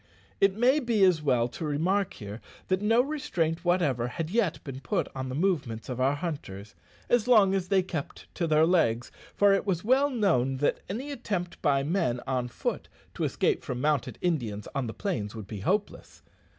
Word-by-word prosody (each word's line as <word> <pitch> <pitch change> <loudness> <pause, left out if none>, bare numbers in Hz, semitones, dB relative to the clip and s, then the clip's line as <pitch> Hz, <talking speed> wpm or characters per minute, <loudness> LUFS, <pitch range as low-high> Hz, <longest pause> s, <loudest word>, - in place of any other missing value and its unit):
It 195 -1 +4
may 250 +6 +4
be 235 -7 +1
as 180 -4 +4
well 125 -5 +2
to 160 - -7
remark 180 +7 0
here, 105 +2 -8 0.3
that 185 +1 +1
no 225 +3 +4
restraint 185 - -2
whatever 155 -10 +1
had 160 +6 -4
yet 205 -6 +1
been 135 -2 -7
put 125 - -1
on 130 -1 -4
the 130 - -4
movements 140 - -1
of 125 0 -3
our 135 +2 +3
hunters 125 - -6 0.3
as 240 -1 +2
long 210 -6 +6
as 190 -2 -1
they 190 -1 +3
kept 165 -6 -6
to 170 - -1
their 155 0 +4
legs, 125 -10 +2 0.2
for 205 -1 +5
it 195 - +1
was 185 -4 -1
well 265 +5 +3
known 165 - +1
that 145 - +1
any 255 +9 -4
attempt 200 -9 -4
by 140 -3 +2
men 155 -6 0
on 125 -2 -1
foot 120 - -4 0.3
to - - -2
escape - - 0
from 125 - -4
mounted 145 -1 0
Indians 120 - -1
on 140 -4 -2
the 110 - -5
plains 115 - -3
would 110 -2 -7
be 105 +1 -7
hopeless. 200 - -2
165 Hz, 190 wpm, -28 LUFS, 130-195 Hz, 0.3 s, long